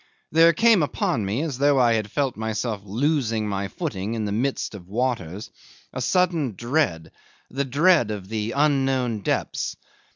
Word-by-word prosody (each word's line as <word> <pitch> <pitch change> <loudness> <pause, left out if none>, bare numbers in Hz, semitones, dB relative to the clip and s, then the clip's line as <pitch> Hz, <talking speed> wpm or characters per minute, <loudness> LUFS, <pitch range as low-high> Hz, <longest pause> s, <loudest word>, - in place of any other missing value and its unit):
There 165 +2 +6
came 225 +3 +4
upon 130 -6 -1
me, 115 +10 -1
as 145 -6 -4
though 145 0 +4
I 120 -2 +4
had 110 -2 -1
felt 135 +2 -1
myself 110 -1 -3
losing 115 0 0
my 100 -1 -2
footing 100 +3 -4
in 110 -2 -2
the 100 - -3
midst 125 +5 -1
of 90 -4 -10
waters, 105 -4 -3 0.4
a 130 - -4
sudden 165 - +1
dread, 120 - -1 0.4
the 140 +2 -1
dread 145 - +3
of 100 -3 -5
the 110 +1 -3
unknown 135 -5 +1
depths. 100 - -2
120 Hz, 160 wpm, -24 LUFS, 105-145 Hz, 0.4 s, There